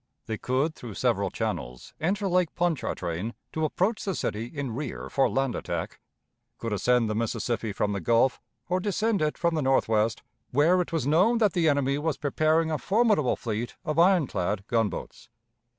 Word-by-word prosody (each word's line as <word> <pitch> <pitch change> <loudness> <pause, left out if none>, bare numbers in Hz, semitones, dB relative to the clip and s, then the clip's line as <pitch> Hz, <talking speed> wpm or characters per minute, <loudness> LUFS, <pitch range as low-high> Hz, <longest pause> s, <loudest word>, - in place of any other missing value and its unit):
They 110 -2 -4
could 135 +5 0
through 120 -8 -9
several - - +1
channels - - -4
enter 195 +5 0
Lake 180 -2 +1
Pontchartrain, 115 - -2 0.2
to 160 0 0
approach 190 +8 0
the 195 -3 -2
city 110 +2 -2
in 140 -3 -5
rear 135 +1 -5
for 135 -2 +3
land 135 +3 0
attack, - - -4 0.6
could 115 -2 -3
ascend 120 +3 +2
the 110 - -1
Mississippi 115 0 -2
from 105 +1 -1
the 100 - -2
Gulf, 115 +8 +2 0.3
or 180 +1 +1
descend 210 +1 0
it 150 0 0
from 170 -1 +1
the 155 - 0
Northwest, 115 -4 +2 0.3
where 165 +7 +4
it 175 - -4
was 160 -6 -1
known 180 - +4
that 215 -5 +3
the 165 -3 +3
enemy 140 -1 +1
was 155 -1 -1
preparing 155 +2 +1
a 155 - -1
formidable 210 - +2
fleet 115 +1 -4
of 155 0 0
iron 180 -2 +5
clad 100 -2 -2
gunboats. 115 -3 -2
140 Hz, 175 wpm, -27 LUFS, 115-170 Hz, 0.6 s, iron